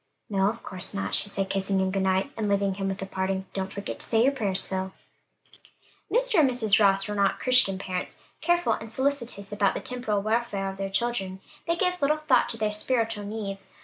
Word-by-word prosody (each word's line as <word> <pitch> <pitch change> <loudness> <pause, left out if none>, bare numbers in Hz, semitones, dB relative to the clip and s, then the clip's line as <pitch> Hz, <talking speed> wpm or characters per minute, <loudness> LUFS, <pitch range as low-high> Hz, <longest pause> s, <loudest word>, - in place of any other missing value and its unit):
"No, 195 0 +3
of 230 +2 -6
course 185 -2 -5
not," 95 0 -2
she 205 - +3
said, 195 -1 -2
kissing 195 0 0
him 190 0 +1
good 195 0 0
night, 190 +7 +1
and 215 -2 -1
leaving 200 -1 +2
him 195 0 -3
with 195 0 -3
a - - -3
parting, 190 0 -2
"Don't 190 0 -3
forget 200 0 -5
to - - -2
say 225 0 +3
your 270 - +5
prayers, 205 -8 0
Phil." 190 0 -3 1.2
Mr. - - +3
and 285 -4 +6
Mrs. 225 -5 +3
Ross 195 0 +4
were 210 - -3
not 200 -1 +2
Christian 250 -7 +3
parents; 185 -1 -4 0.2
careful 345 0 +2
and 225 0 -6
solicitous 240 -6 -1
about 205 -1 +2
the - - -1
temporal 220 -5 -1
welfare 215 -3 0
of 190 - -11
their 195 0 -3
children, 195 -3 -1 0.3
they 335 - +2
gave 360 0 0
little 295 +2 +3
thought 275 -5 +3
to 230 - -3
their 215 -1 0
spiritual 225 -1 -1
needs. 200 -2 -5
200 Hz, 215 wpm, -27 LUFS, 195-240 Hz, 1.2 s, and